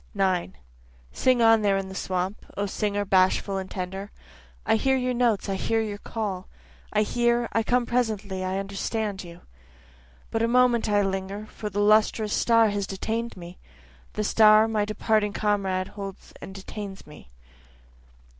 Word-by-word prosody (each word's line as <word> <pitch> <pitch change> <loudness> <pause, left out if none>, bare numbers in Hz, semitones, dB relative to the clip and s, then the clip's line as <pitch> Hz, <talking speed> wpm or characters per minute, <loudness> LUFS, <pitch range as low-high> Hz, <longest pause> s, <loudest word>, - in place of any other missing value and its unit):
9 185 - 0 0.5
Sing 255 -2 +2
on 225 -1 +6
there 200 -2 +2
in 195 0 -3
the 190 - -8
swamp, 185 +1 -3
O 200 - 0
singer 205 0 -1
bashful 190 +1 +2
and 190 0 -5
tender, 190 +2 -5 0.6
I 220 - +3
hear 265 +4 +2
your 255 0 -1
notes, 235 -4 +1
I 195 - -1
hear 225 +4 0
your 210 -2 -3
call, 200 -5 -4 0.4
I 210 0 +2
hear, 240 +1 +1
I 225 - +2
come 245 +2 +1
presently, 215 -6 -1
I 185 +1 -2
understand 200 +1 -3
you, 170 -1 -12 0.9
But 225 - -1
a 230 - +3
moment 245 -2 +3
I 205 -1 +3
linger, 195 +2 -3
for 215 0 -7
the 205 +1 -1
lustrous 215 0 +3
star 230 -2 +4
has 205 -1 -2
detain'd 225 +4 -3
me, 175 0 -10 0.5
The 210 - -2
star 215 +1 +6
my 215 -2 0
departing 215 0 0
comrade 195 -3 0
holds 195 -2 -9
and 195 - -9
detains 195 0 -8
me. 150 - -14
205 Hz, 160 wpm, -25 LUFS, 195-225 Hz, 0.9 s, on